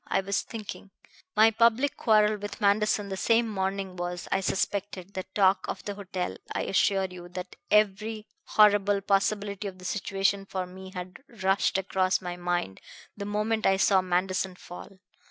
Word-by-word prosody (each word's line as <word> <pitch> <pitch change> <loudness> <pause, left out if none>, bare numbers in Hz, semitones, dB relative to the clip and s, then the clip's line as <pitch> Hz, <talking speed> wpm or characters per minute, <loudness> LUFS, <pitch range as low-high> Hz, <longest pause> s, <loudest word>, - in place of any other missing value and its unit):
I - - +1
was 195 +1 -1
thinking. 215 -3 -8 0.5
My 220 +1 +6
public 235 +5 +3
quarrel 215 -2 +3
with 205 0 -7
Manderson 205 0 +2
the 190 - -3
same 230 +4 +3
morning 195 -2 -2
was, 175 0 -4
I - - +2
suspected, 195 0 -2
the 185 - -4
talk 190 -1 +3
of - - -4
the 205 - -3
hotel. 185 -2 -4
I - - -1
assure 195 0 +2
you 180 -1 -9
that 180 +1 -7
every 215 +1 +2 0.2
horrible 205 -1 +4
possibility 200 0 0
of 190 -1 -8
the 185 - -12
situation 195 0 0
for 185 -1 -3
me 190 +1 -10
had 180 0 -6 0.3
rushed 190 0 +2
across 190 -1 +1
my 180 -1 -5
mind 175 - -2 0.3
the 200 - -6
moment 215 +2 0
I 195 - +4
saw 195 -1 +4
Manderson 185 +1 -1
fall. 180 +2 -11
195 Hz, 165 wpm, -28 LUFS, 185-210 Hz, 0.5 s, My